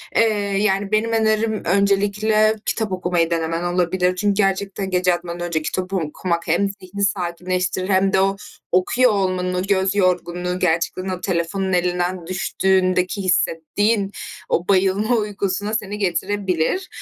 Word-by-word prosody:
Eee, -, -, +5 dB, 0.4 s
yani, 195 Hz, -1 st, 0 dB
benim 215 Hz, +2 st, +1 dB
önerim 220 Hz, -1 st, +1 dB
öncelikle 205 Hz, +3 st, +2 dB
kitap 220 Hz, -3 st, -1 dB
okumayı 180 Hz, -2 st, 0 dB
denemen 165 Hz, 0 st, -1 dB
olabilir. 180 Hz, +1 st, +1 dB
Çünkü 205 Hz, +2 st, +1 dB
gerçekten 195 Hz, -1 st, -1 dB
gece 180 Hz, 0 st, +2 dB
yatmadan 175 Hz, 0 st, -4 dB
önce 160 Hz, -2 st, -1 dB
kitap 185 Hz, +4 st, -3 dB
okumak 170 Hz, 0 st, -2 dB
hem 180 Hz, +5 st, +2 dB
zihni 195 Hz, 0 st, -6 dB
sakinleştirir 185 Hz, 0 st, -1 dB
hem 190 Hz, 0 st, +2 dB
de 190 Hz, -, +4 dB
o 195 Hz, +1 st, +2 dB, 0.4 s
okuyor 245 Hz, +7 st, +3 dB
olmanın, 185 Hz, -2 st, 0 dB
göz 190 Hz, 0 st, +1 dB
yorgunluğu, 180 Hz, -1 st, 0 dB
gerçekten 180 Hz, +2 st, 0 dB
o 185 Hz, -1 st, -4 dB
telefonun 185 Hz, +1 st, -1 dB
elinden 180 Hz, 0 st, 0 dB
düştüğündeki 185 Hz, 0 st, +1 dB
hissettiğin 195 Hz, +3 st, +1 dB, 0.4 s
o 175 Hz, -, 0 dB
bayılma 195 Hz, +4 st, +2 dB
uykusuna 205 Hz, -1 st, -2 dB
seni 210 Hz, -2 st, -2 dB
getirebilir. 190 Hz, -, -1 dB
190 Hz, 130 wpm, -21 LUFS, 180-200 Hz, 0.4 s, Eee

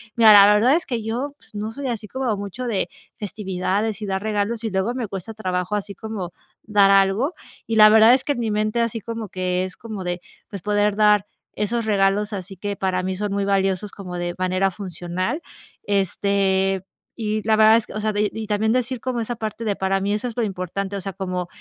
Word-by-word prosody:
"Mira, 225 Hz, -2 st, +8 dB
la 205 Hz, 0 st, +9 dB
verdad 230 Hz, +7 st, +5 dB
es 340 Hz, -, -1 dB
que 235 Hz, -4 st, -2 dB
yo, 250 Hz, +6 st, -3 dB, 0.2 s
no 210 Hz, +1 st, -3 dB
soy 275 Hz, +4 st, -5 dB
así 225 Hz, -3 st, -4 dB
como 260 Hz, -4 st, -1 dB
mucho 205 Hz, +5 st, -5 dB
de 230 Hz, -, -1 dB
de 190 Hz, -, 0 dB, 0.3 s
festividades 200 Hz, +1 st, -2 dB
y -, -, -3 dB
dar 190 Hz, 0 st, -1 dB
regalos 215 Hz, +2 st, -1 dB
y -, -, 0 dB
luego 190 Hz, +5 st, 0 dB
me 245 Hz, -4 st, -2 dB
cuesta 195 Hz, +2 st, -6 dB
trabajo, 185 Hz, -1 st, -2 dB
así 205 Hz, 0 st, -3 dB
como 195 Hz, -5 st, -6 dB, 0.3 s
dar 205 Hz, -2 st, +4 dB
algo, 195 Hz, -, +3 dB, 0.3 s
y 225 Hz, -, -1 dB
la 215 Hz, 0 st, +10 dB
verdad 220 Hz, +2 st, +7 dB
es 260 Hz, -, -2 dB
que 290 Hz, -, +1 dB
en 255 Hz, -, -6 dB
mi 230 Hz, -2 st, -1 dB
mente, 215 Hz, +2 st, 0 dB
así 230 Hz, 0 st, -1 dB
como 225 Hz, -1 st, -6 dB
que 185 Hz, 0 st, -1 dB
es 185 Hz, 0 st, -6 dB
como 215 Hz, -4 st, -6 dB
de, 180 Hz, 0 st, -2 dB, 0.3 s
pues, 200 Hz, -3 st, -7 dB
poder 205 Hz, 0 st, +2 dB
dar 210 Hz, -2 st, +4 dB, 0.3 s
esos 225 Hz, +2 st, -1 dB
regalos, 205 Hz, 0 st, +2 dB
así 195 Hz, 0 st, -6 dB
que 205 Hz, +2 st, -3 dB
para 185 Hz, -1 st, 0 dB
mí 185 Hz, 0 st, -2 dB
son 205 Hz, +1 st, -3 dB
muy 200 Hz, 0 st, 0 dB
valiosos, 195 Hz, 0 st, 0 dB
como 180 Hz, -3 st, -7 dB
de 175 Hz, 0 st, -3 dB
manera 185 Hz, +1 st, +1 dB
funcional, 185 Hz, -, -4 dB, 0.4 s
este, 195 Hz, -1 st, +1 dB, 0.3 s
y 215 Hz, -1 st, -2 dB
la 220 Hz, -, +5 dB
verdad 220 Hz, +1 st, +7 dB
es 230 Hz, -, -2 dB
que", -, -, -10 dB
o 215 Hz, -, -3 dB
sea, 215 Hz, 0 st, +1 dB
y 210 Hz, 0 st, +2 dB
y 220 Hz, -1 st, -5 dB
también 215 Hz, +1 st, +1 dB
decir 250 Hz, 0 st, -1 dB
como 250 Hz, 0 st, -2 dB
esa 235 Hz, +1 st, -4 dB
parte 220 Hz, +1 st, -4 dB
de, 210 Hz, -3 st, -1 dB
para 195 Hz, 0 st, 0 dB
mí 200 Hz, +1 st, 0 dB
eso 215 Hz, +4 st, -2 dB
es 235 Hz, -, -6 dB
lo 240 Hz, -, 0 dB
importante, 195 Hz, 0 st, -3 dB
o -, -, -5 dB
sea, 195 Hz, +1 st, -5 dB
como 180 Hz, -1 st, -3 dB
205 Hz, 225 wpm, -22 LUFS, 190-220 Hz, 0.4 s, la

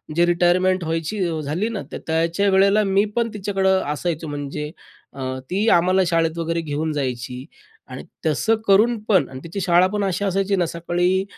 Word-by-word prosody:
जे 170 Hz, +1 st, +4 dB
रिटायरमेंट 180 Hz, +1 st, +2 dB
व्हायची 165 Hz, +5 st, -3 dB, 0.2 s
झाली 165 Hz, +10 st, -2 dB
ना, 220 Hz, -4 st, -4 dB
तर -, -, -5 dB
त्याच्या 165 Hz, +5 st, +1 dB
वेळेला, 200 Hz, +2 st, +4 dB
मी 195 Hz, +1 st, +2 dB
पण 235 Hz, -1 st, +1 dB
तिच्याकडं 195 Hz, -2 st, +1 dB
असायचो. 160 Hz, 0 st, -3 dB
म्हणजे 145 Hz, +1 st, -5 dB, 0.4 s
अ, 135 Hz, -, -9 dB, 0.3 s
ती 200 Hz, +5 st, 0 dB
आम्हाला 185 Hz, +2 st, +3 dB
शाळेत 165 Hz, -1 st, +1 dB
वगैरे 165 Hz, 0 st, -1 dB
घेऊन 155 Hz, +1 st, -2 dB
जायची 125 Hz, -2 st, -4 dB, 0.4 s
आणि -, -, -8 dB, 0.2 s
तसं 160 Hz, +9 st, +2 dB
करूनपण 210 Hz, 0 st, +3 dB
आणि 130 Hz, -, -8 dB
तिची 170 Hz, +4 st, -5 dB
शाळापण 185 Hz, +3 st, +3 dB
अशी 195 Hz, +1 st, -1 dB
असायची 195 Hz, +1 st, 0 dB
ना, 180 Hz, -2 st, +1 dB
सकाळी 175 Hz, +3 st, 0 dB
175 Hz, 160 wpm, -21 LUFS, 160-195 Hz, 0.4 s, जे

